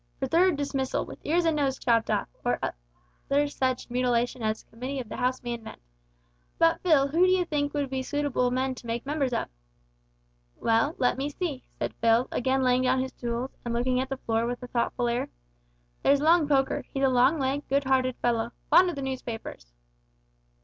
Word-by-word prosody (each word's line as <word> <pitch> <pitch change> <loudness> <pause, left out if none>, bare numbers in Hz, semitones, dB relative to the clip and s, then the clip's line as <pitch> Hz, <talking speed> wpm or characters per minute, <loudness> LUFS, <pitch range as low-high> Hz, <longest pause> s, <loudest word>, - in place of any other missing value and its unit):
For 270 - -2
third 340 +5 +3
dismissal, 275 -2 -1
with - - -10
ears 340 +3 +1
and 325 -1 +2
noses 270 -2 0
chopped 230 -2 +1
off, - - 0 0.2
or - - +1 0.9
such 290 - -9
other 255 -1 +1
mutilation 245 0 +1
as 215 0 -1
a - - -38
committee 255 +4 -5
of 240 -4 -6
the - - -6
house 255 +1 -1
may 240 -1 -3
invent. 225 -2 -8 0.8
But, 330 0 +3
Phil, 295 -6 +4
who 340 +5 +4
d'yee 370 -1 +3
think 295 -3 -2
would 285 -2 -1
be 265 -1 -1
suitable 285 -2 0
men 260 +1 0
to 245 - -11
make 230 +2 -3
members 280 -2 -1
of?" 235 - -1 1.1
"Well, 225 +7 +1
let 250 +1 +1
me 280 +2 -1
see," 295 -3 -4
said - - -3
Phil, 230 +2 +4
again 265 +1 +1
laying 250 0 +3
down 255 0 +2
his 260 0 -2
tools, 240 +2 -3
and 235 -1 -3
looking 250 +1 +1
at 260 +1 -2
the 270 - -3
floor 230 -2 -1
with 245 +1 -4
a - - -6
thoughtful 240 0 0
air, 235 +1 -1 0.7
"there's 280 0 +4
Long 320 +1 +4
Poker, 270 -2 +1
he's 270 - -2
a - - +6
long 260 +4 +4
legged, 275 +1 -1
good 280 +1 +1
hearted 260 -1 +1
fellow 235 -1 0 0.2
fond 365 0 +7
o' - - -3
the 275 - -4
newspapers." 235 - -6
260 Hz, 200 wpm, -27 LUFS, 245-285 Hz, 1.1 s, fond